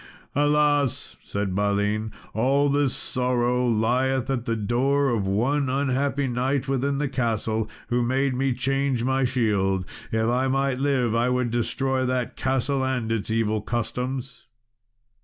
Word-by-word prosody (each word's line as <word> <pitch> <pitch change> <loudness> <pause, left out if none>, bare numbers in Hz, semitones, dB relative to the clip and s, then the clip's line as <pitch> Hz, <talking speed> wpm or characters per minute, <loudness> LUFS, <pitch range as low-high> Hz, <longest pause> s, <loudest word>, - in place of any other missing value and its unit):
"Alas!" 145 -2 +2
said 100 -2 -3
Balin, 105 +2 0 0.2
"all 135 +5 +2
this 140 -2 +1
sorrow 125 -1 0
lieth 125 +4 +1
at 125 -3 -2
the 115 - 0
door 130 +6 +1
of 110 -5 0
one 130 +8 +1
unhappy 135 +1 0
knight 130 +2 -1
within 135 +1 0
the 145 0 0
castle, 110 -4 -1 0.2
who 120 0 +1
made 130 +3 +1
me 135 +1 0
change 135 0 0
my 130 +1 +1
shield. 100 -7 +1 0.3
If 110 0 +1
I 125 +2 +1
might 135 -1 0
live, 135 -5 +1
I 120 +2 +2
would 125 -2 0
destroy 130 +2 0
that 125 -1 -1
castle 135 +1 0
and 125 -4 -1
its 115 -2 -2
evil 110 -1 0
customs." 125 +4 -4
125 Hz, 140 wpm, -25 LUFS, 115-135 Hz, 0.3 s, Alas